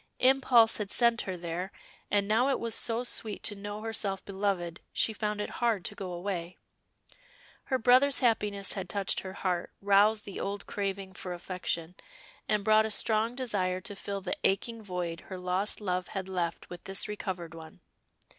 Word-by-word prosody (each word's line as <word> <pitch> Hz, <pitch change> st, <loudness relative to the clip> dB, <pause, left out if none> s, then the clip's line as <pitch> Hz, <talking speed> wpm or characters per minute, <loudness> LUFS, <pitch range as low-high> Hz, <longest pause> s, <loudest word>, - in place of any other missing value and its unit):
Impulse 255 Hz, -4 st, +5 dB
had 205 Hz, -2 st, -2 dB
sent 235 Hz, 0 st, +4 dB
her 185 Hz, -, -2 dB
there, 175 Hz, +2 st, -4 dB, 0.4 s
and 200 Hz, -1 st, +2 dB
now 230 Hz, +5 st, +3 dB
it 275 Hz, -, +1 dB
was 230 Hz, -1 st, -1 dB
so 230 Hz, +1 st, +2 dB
sweet 220 Hz, -3 st, -3 dB
to 210 Hz, -, 0 dB
know 205 Hz, +1 st, -6 dB
herself 210 Hz, -4 st, -1 dB
beloved, 190 Hz, -3 st, -2 dB
she 220 Hz, -, +1 dB
found 210 Hz, -1 st, -2 dB
it 210 Hz, -, -3 dB
hard 225 Hz, -6 st, +2 dB
to -, -, -2 dB
go 190 Hz, -2 st, -6 dB
away. 175 Hz, -1 st, -4 dB, 1.1 s
Her 260 Hz, -, +1 dB
brother's 255 Hz, +3 st, +5 dB
happiness 210 Hz, -5 st, +1 dB
had 190 Hz, -3 st, -5 dB
touched 200 Hz, -2 st, 0 dB
her 190 Hz, 0 st, -6 dB
heart, 180 Hz, -3 st, -1 dB
roused 205 Hz, +2 st, +4 dB
the 200 Hz, -, -6 dB
old 200 Hz, 0 st, -3 dB
craving 195 Hz, -1 st, -3 dB
for 180 Hz, -1 st, -5 dB
affection, 175 Hz, -1 st, -3 dB, 0.6 s
and 210 Hz, -1 st, +2 dB
brought 215 Hz, +1 st, +5 dB
a -, -, -5 dB
strong 220 Hz, +2 st, +2 dB
desire 200 Hz, -8 st, 0 dB
to 205 Hz, +1 st, -5 dB
fill 200 Hz, 0 st, -4 dB
the -, -, -2 dB
aching 225 Hz, +4 st, +1 dB
void 180 Hz, -4 st, -3 dB
her 190 Hz, -, -5 dB
lost 180 Hz, +3 st, -1 dB
love 185 Hz, -3 st, -1 dB
had 190 Hz, -2 st, -4 dB
left 175 Hz, -3 st, -2 dB
with 175 Hz, -, -9 dB
this 195 Hz, 0 st, 0 dB
recovered 185 Hz, -5 st, -4 dB
one. 160 Hz, -1 st, -11 dB
200 Hz, 175 wpm, -30 LUFS, 185-220 Hz, 1.1 s, Impulse